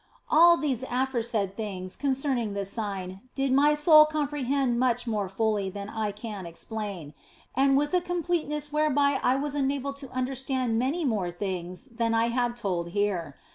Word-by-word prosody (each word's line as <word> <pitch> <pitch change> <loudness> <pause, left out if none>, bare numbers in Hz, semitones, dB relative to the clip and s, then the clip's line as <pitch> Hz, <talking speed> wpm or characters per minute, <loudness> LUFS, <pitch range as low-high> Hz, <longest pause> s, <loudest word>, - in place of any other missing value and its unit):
All 340 +2 +7
these 270 -7 -1
aforesaid 235 -6 -1
things 190 -4 -5
concerning 265 -6 -1
this 200 -1 -3
sign 195 -4 -4
did 270 -1 0
my 295 +2 +5
soul 305 0 +7
comprehend 280 -4 0
much 245 -1 +1
more 210 -5 -2
fully 205 -1 0
than 200 +1 -7
I 215 -2 -2
can 205 -3 -7
explain, 185 -3 -6 0.4
and 270 +1 +3
with 295 +3 0
a 360 - +3
completeness 335 -4 -2
whereby 290 -2 +2
I 250 - +3
was 285 +1 -2
enabled 280 0 -1
to 275 -2 -7
under 255 +1 -2
stand 260 -3 -1
many 295 +7 0
more 210 -8 0
things 180 +2 -5
than 230 -3 -1
I 230 +1 +2
have 240 0 0
told 185 -7 -2
here. 180 -8 -1
245 Hz, 165 wpm, -27 LUFS, 205-280 Hz, 0.4 s, All